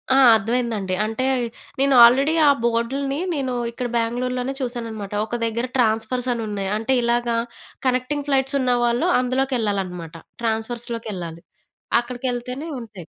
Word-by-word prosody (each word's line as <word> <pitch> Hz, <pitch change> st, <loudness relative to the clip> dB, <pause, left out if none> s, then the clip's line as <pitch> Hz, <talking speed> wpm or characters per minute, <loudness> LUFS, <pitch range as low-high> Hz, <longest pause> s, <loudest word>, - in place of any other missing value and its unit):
ఆ! -, -, +5 dB, 0.2 s
అర్థమైందండి. 220 Hz, -3 st, -1 dB
అంటే, 225 Hz, +4 st, -2 dB, 0.6 s
నేను 275 Hz, 0 st, +4 dB
ఆల్రెడీ 270 Hz, +6 st, +6 dB
ఆ -, -, +8 dB
బోర్డ్‌ 235 Hz, +1 st, +1 dB
లని 275 Hz, 0 st, -2 dB, 0.2 s
నేను 270 Hz, -4 st, -2 dB, 0.2 s
ఇక్కడ 245 Hz, +1 st, -4 dB
బెంగుళూరు‌లోనే 250 Hz, +3 st, -1 dB
చూసానన్నమాట. 230 Hz, -5 st, -4 dB
ఒక 235 Hz, +2 st, -3 dB
దగ్గర 230 Hz, +2 st, -1 dB
ట్రాన్స్‌ఫర్స్ 235 Hz, +2 st, +1 dB
అని 235 Hz, -1 st, -3 dB
ఉన్నాయి. 200 Hz, -2 st, -3 dB
అంటే, 225 Hz, +4 st, +1 dB
ఇలాగ 240 Hz, 0 st, +1 dB, 0.6 s
కనెక్టింగ్ 255 Hz, +3 st, -1 dB
ఫ్లైట్స్ 270 Hz, 0 st, +2 dB
ఉన్నవాళ్ళు 245 Hz, +3 st, +2 dB
అందులోకెళ్ళాలన్నమాట. 210 Hz, -, -1 dB, 0.3 s
ట్రాన్స్‌ఫర్స్‌లోకెళ్ళాలి. 220 Hz, -6 st, -3 dB, 0.6 s
అక్కడికెళ్తేనే 250 Hz, +4 st, -4 dB
ఉంటాయి. 210 Hz, -7 st, -10 dB
240 Hz, 120 wpm, -22 LUFS, 220-255 Hz, 0.6 s, ఆ